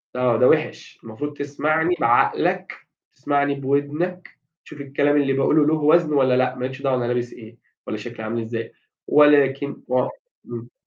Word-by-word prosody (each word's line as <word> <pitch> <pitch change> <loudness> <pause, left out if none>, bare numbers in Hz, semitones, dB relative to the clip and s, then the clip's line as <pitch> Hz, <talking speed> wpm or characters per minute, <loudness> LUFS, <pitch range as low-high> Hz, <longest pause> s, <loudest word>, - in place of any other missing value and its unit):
آه 125 -2 +1
ده 125 - +4
وحِش، 155 0 -1
المفروض 140 +7 -6
تسمعني 155 +4 0
بعقلك 120 -3 +1 0.4
تسمعني 140 +1 0
بودنك 145 +7 -2 0.4
تشوف 145 - -11
الكلام 145 +1 0
اللي 135 -1 0
باقوله 145 +3 +2
له 155 - +2
وزن 155 +1 +3
والّا 130 -3 +3
لأ، 130 0 +1
ما 125 0 -4
لكش 130 +2 -7
دعوة 135 -2 0
أنا 120 - -2
لابس 120 0 -2
إيه 115 0 -14 0.3
والّا 110 - -4
شكلي 115 +1 -8
عامل 115 +2 -3
إزاي، 115 0 -6 0.3
ولكن 140 -1 +3
و 125 0 +1 0.4
امم. 120 0 -9
135 Hz, 160 wpm, -22 LUFS, 125-145 Hz, 0.4 s, ده